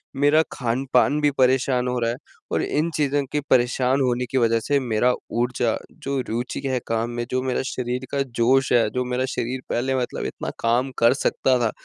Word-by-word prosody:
मेरा 145 +3 +4
खान-पान 130 +3 +1
भी 145 -1 +3
परेशान 130 -1 +3
हो 125 - -1
रहा 115 0 0
है 120 - -5 0.3
और - - +1
इन 155 +3 0
चीज़ों 145 -1 +1
के 150 - +2
परेशान 125 +2 +2
होने 125 -1 +1
की 135 - +1
वज़ह 115 -1 +3
से 145 -1 +3
मेरा 125 0 +1 0.3
ऊर्जा 120 -2 0 0.3
जो 140 0 -1
रुचि 120 +3 -3
है 130 -1 0
काम 115 +1 -1
में, 120 0 -3
जो 130 0 +1
मेरा 130 -1 0
शरीर 125 +1 -3
का 140 - 0
जोश 130 +1 +2
है, 115 -3 +4
जो 125 +3 -2
मेरा 125 +1 -1
शरीर 125 +2 -2
पहले 130 +2 0
मतलब 125 - -3
इतना - - -4
काम 120 +3 +1
कर 115 +2 +5
सकता 130 -1 +1
था 115 -2 +1
125 Hz, 200 wpm, -23 LUFS, 120-135 Hz, 0.3 s, कर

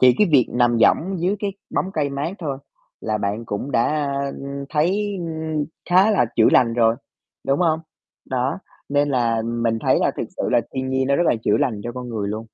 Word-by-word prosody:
chỉ 125 -1 +6
cái 210 - +5
việc 130 -5 +5
nằm 120 -1 +2
võng 185 - +2
dưới 185 +4 +1
cái 200 -1 -2 0.2
bóng 190 +1 -1
cây 145 -5 -1
mát 140 +5 -3
thôi 145 -6 -4 0.4
là 110 -1 -1
bạn 105 +3 -2
cũng 115 +5 -4
đã, 120 -3 +2
a, 140 -2 -1
ừm, 140 0 -6
thấy 195 +6 0 0.7
khá 190 +4 +5
là 200 - +3
chữa 110 - +6
lành 115 -2 +4
rồi, 115 -1 +3 0.5
đúng 140 +3 +2
không? 160 -2 +2 0.5
Đó, 130 +4 -1 0.3
nên 145 0 +2
là 115 -4 +1
mình 115 -1 -1
thấy - - +4
là - - +2
thực - - -2
sự - - -1
là - - +4
thiên 130 0 -2
nhiên 130 0 +1
nó 140 - +3
rất 175 - +2
là - - +4
chữa 105 - +3
lành 110 -6 0
cho 120 - -4
con 125 -1 -7
người 105 -4 -3
luôn. 110 +2 -4
135 Hz, 215 wpm, -22 LUFS, 115-155 Hz, 0.7 s, chỉ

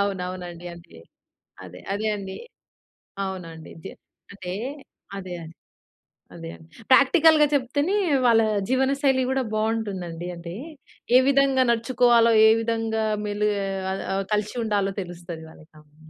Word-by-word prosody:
అవునవునండి. 180 -3 -4
అంతే. 165 - -15 0.7
అదే. - - -11
అదే 210 +2 -2
అండి. 195 -1 -7 0.9
అవునండి. 165 -4 -8
జె - - -7 0.4
అంటే, 190 -3 -7 0.7
అదే 185 -2 -7
అండి. 160 +1 -13 0.8
అదే 165 -1 -8
అండి. 160 - -17 0.2
ప్రాక్టికల్‌గా 300 +3 +6
చెప్తేనే, 285 +7 0 0.3
వాళ్ళ 230 -2 +5 0.3
జీవనశైలి 265 0 +2
కూడా 265 -1 0
బావుంటుందండి. 200 -6 -2
అంటే, 170 0 -8 0.6
ఏ - - +8
విధంగా 275 -1 +4
నడుచుకోవాలో, 235 0 +3 0.2
ఏ - - +7
విధంగా 225 -1 -1 0.2
మెలిగే 205 0 0 0.3
అల్ 195 - -4
ఆహ్, 195 0 -1
కలిసి 210 +2 -1
ఉండాలో 200 -3 0
తెలుస్తది 175 -2 -8
వాళ్ళకవును. 155 -1 -19
205 Hz, 115 wpm, -24 LUFS, 175-250 Hz, 0.9 s, ఏ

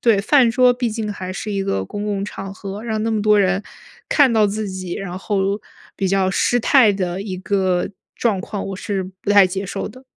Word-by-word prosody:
对， 225 -4 +3
饭 250 +3 +4
桌 250 +1 +5
毕 245 -1 -1
竟 215 -1 -3
还 185 -2 -6
是 210 +3 -5
一 195 -1 -1
个 95 - -1
公 205 - -5
共 200 -1 -2
场 195 -1 -7
合， 195 +1 -7
让 220 -2 -2
那 225 - 0
么 220 - 0
多 210 0 +4
人 190 0 +2 0.5
看 280 -5 +4
到 220 -2 +4
自 210 +1 -3
己， 185 -2 -6
然 185 -2 -5
后 195 +1 -1 0.4
比 195 - -1
较 190 0 +2
失 245 +5 +2
态 235 -3 +5
的 185 -2 -2
一 190 -3 -5
个 185 -2 0 0.3
状 215 -6 0
况， 200 +2 -5
我 195 - -5
是 195 0 -2 0.2
不 200 - -3
太 200 -2 +7
接 195 +2 -4
受 - - -4
的。 255 +5 -14
200 Hz, 235 characters per minute, -20 LUFS, 190-220 Hz, 0.5 s, 太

